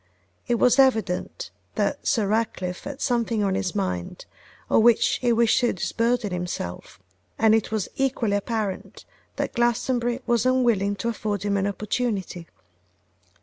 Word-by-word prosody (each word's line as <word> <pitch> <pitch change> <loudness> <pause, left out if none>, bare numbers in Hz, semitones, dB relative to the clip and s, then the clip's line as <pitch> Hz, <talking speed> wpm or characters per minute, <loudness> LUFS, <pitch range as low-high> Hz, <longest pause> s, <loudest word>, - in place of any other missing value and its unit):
It 240 - +2
was 250 +3 +3
evident 260 - +1 0.2
that - - -1
Sir 225 -7 +2
Ratcliffe 195 -4 -2
had 285 -1 -7
something 235 -3 0
on 195 -1 +1
his 190 0 -2
mind 90 - -3 0.4
of - - +4
which 235 0 +4
he 245 -2 +1
wished 230 -1 +3
to 245 - +1
disburden 230 +3 -1
himself; 175 - -5 0.4
and 220 -1 +4
it 225 -1 +1
was 215 -4 -1
equally 250 -6 0
apparent 210 -2 -4 0.3
that - - -3
Glastonbury 240 0 0
was 235 -2 +2
unwilling 235 -6 +2
to 230 +4 -2
afford 210 -3 -3
him 205 -1 0
an 200 0 +1
opportunity. 200 -4 -3
220 Hz, 145 wpm, -24 LUFS, 200-240 Hz, 0.4 s, of